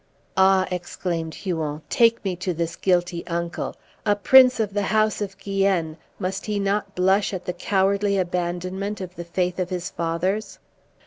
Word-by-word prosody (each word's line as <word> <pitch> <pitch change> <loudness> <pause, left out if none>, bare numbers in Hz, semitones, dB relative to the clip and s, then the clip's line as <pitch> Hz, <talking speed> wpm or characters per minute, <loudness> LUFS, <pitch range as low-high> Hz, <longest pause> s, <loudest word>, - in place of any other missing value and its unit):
"Ah!" 190 0 +4
exclaimed 175 -2 -3
Huon, 160 -5 -3
"take 230 -2 +3
me 190 -2 0
to 180 -1 -2
this 165 0 -2
guilty 175 -2 +1
uncle. 170 0 -3 0.3
A 205 -2 +3
prince 255 +4 +6
of 210 -3 -1
the 205 - +1
house 215 +2 +1
of 195 -1 -4
Guienne, 195 -5 0 0.2
must 190 +3 -3
he 210 -1 -1
not 200 0 -1
blush 190 +2 +2
at 180 - -6
the 180 - -2
cowardly 200 +2 +1
abandonment 185 +3 -2
of 185 -1 -7
the 175 - -6
faith 180 +1 -2
of 180 -1 -1
his 180 -1 -4
fathers?" 175 +6 -2
185 Hz, 165 wpm, -23 LUFS, 175-200 Hz, 0.3 s, prince